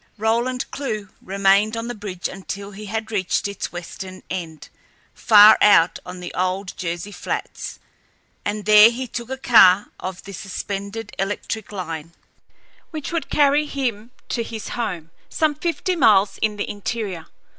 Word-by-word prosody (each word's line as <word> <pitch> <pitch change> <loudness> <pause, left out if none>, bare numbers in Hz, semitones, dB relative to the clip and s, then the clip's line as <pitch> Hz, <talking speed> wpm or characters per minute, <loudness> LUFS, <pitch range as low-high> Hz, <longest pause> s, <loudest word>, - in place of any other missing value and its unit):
Roland 235 +4 0
Clewe 215 -8 -4
remained 200 +3 +2
on 230 +1 -4
the 245 - -3
bridge 200 -5 -5
until 200 +1 -7
he 210 +2 -9
had 220 +2 -4
reached 195 -2 0
its 200 -1 -5
western 185 +2 -8
end, 165 -4 -6 0.4
far 215 -1 +7
out 190 -5 +5
on 180 0 -7
the 175 - -7
old 185 +1 -2
Jersey 175 +3 -4
flats, - - -5 0.7
and 205 0 -3
there 210 +1 +8
he 250 +2 -4
took 235 0 -6
a 265 - -4
car 205 -6 +6
of 185 -1 -6
the 200 - -9
suspended 200 +3 -6
electric 205 +2 -3
line, 165 -4 -6 0.8
which 310 -4 -6
would 335 -2 -2
carry 295 +1 +3
him 240 -6 -3 0.2
to 235 - -1
his 225 -2 -6
home, 175 -9 -4 0.2
some 310 -2 +1
fifty 340 +4 -2
miles 205 - +4
in 215 -1 +1
the 205 - -3
interior. 205 -5 -4
205 Hz, 150 wpm, -22 LUFS, 190-230 Hz, 0.8 s, there